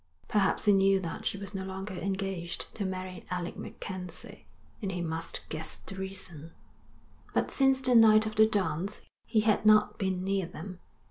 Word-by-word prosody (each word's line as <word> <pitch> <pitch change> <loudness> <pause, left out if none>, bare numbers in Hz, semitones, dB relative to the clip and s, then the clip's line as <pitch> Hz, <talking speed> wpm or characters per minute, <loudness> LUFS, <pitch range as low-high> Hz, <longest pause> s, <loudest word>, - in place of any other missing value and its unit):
Perhaps 205 0 +2
he 205 - +6
knew 195 0 +4
that 170 -3 -4
she - - -1
was 200 0 -7
no 190 -1 -3
longer 190 +1 -5
engaged 190 -2 -3
to 205 - -3
marry 185 -1 -5
Alec 180 -1 -3
MacKenzie, 180 -3 -8 0.3
and 195 -3 -2
he 180 - -3
must 165 -1 -4
guess 160 0 -3
the - - -9
reason; 185 -5 -5 0.8
but - - +1
since 270 -1 +3
the 255 -1 +2
night 220 -2 +7
of 215 - -3
the 220 0 +6
dance 200 -2 -1 0.3
he 220 -2 +3
had 215 -1 +2
not 215 0 +5
been 190 -2 -1
near 195 -2 0
them. 185 +1 -8
190 Hz, 175 wpm, -30 LUFS, 180-210 Hz, 0.8 s, night